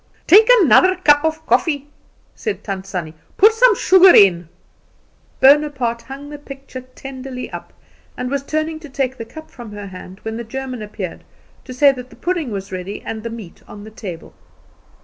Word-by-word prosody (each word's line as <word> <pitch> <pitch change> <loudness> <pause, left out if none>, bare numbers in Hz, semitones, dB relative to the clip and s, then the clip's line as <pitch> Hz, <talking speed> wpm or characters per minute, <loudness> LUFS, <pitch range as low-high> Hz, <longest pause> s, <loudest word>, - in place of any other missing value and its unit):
"Take 425 +6 +7
another 370 +2 +5
cup 295 -5 +3
of 320 0 -2
coffee," 285 +4 0 0.5
said 435 - -5
Tant 195 -2 -5
Sannie. 175 -5 -5 0.2
"Put 425 +3 +6
some 465 0 +5
sugar 375 0 +6
in." 175 -4 +5 0.9
Bonaparte 265 -4 +3
hung 275 +3 -10
the 295 - -8
picture 275 -2 -10
tenderly 255 0 -9
up, - - -9 0.5
and 250 +1 -4
was 280 -1 -1
turning 310 +2 -3
to 310 -2 -12
take 265 -1 -3
the 230 - -5
cup 315 +7 -12
from 235 -4 -11
her 205 -1 -8
hand, 185 0 -11
when 220 0 -5
the 235 - -5
German 255 0 -6
appeared, 205 -4 -7 0.4
to 255 - -8
say 280 +1 +5
that 250 -1 -9
the - - -16
pudding 345 -6 -2
was 195 -2 -6
ready 185 +2 -6
and 220 - -6
the 230 - -5
meat 225 -7 -10
on 205 0 -11
the 215 - -11
table. 185 -6 -9
260 Hz, 180 wpm, -19 LUFS, 215-300 Hz, 0.9 s, Take